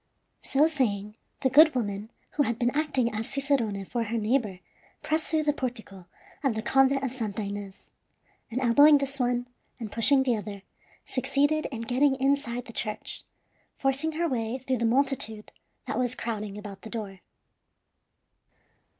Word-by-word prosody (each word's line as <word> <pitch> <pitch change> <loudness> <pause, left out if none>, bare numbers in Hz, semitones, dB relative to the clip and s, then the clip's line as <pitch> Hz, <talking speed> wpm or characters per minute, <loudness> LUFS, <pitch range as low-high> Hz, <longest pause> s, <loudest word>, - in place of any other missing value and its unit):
So 280 +3 +3
saying, 210 -9 -1 0.3
the 260 - +3
good 310 +2 +7
woman 205 -3 -2 0.2
who 300 - 0
had 235 -5 +1
been 240 +1 +1
acting 280 -6 0
as 220 +1 -3
cicerone 265 -8 0
for 235 +3 -2
her 230 +2 -2
neighbor 215 -3 0 0.5
pressed 315 +1 0
through 315 -1 +1
the 295 -1 +2
portico 220 -9 -6 0.4
of 265 -5 +1
the 220 - -3
Convent 270 +2 +3
of 265 - -1
Santa 220 -4 -3
Ines, 200 -1 -7 0.6
and 235 +2 -2
elbowing 285 +4 +6
this 275 0 -4
one 245 0 0 0.3
and 220 -3 -6
pushing 265 +4 +5
the 250 -3 +2
other, 200 -2 -6 0.4
succeeded 280 +4 +1
in 235 -4 -6
getting 265 +4 +2
inside 265 -3 0
the 230 - -11
church, 215 -2 -2 0.6
forcing 275 +4 0
her 335 +2 0
way 235 -3 -2
through 260 0 -2
the 235 - +1
multitude 240 -3 0 0.3
that - - -2
was 250 0 0
crowding 215 -3 -4
about 205 -2 -9
the 220 - -9
door. 205 -5 -6
245 Hz, 160 wpm, -27 LUFS, 220-275 Hz, 0.6 s, good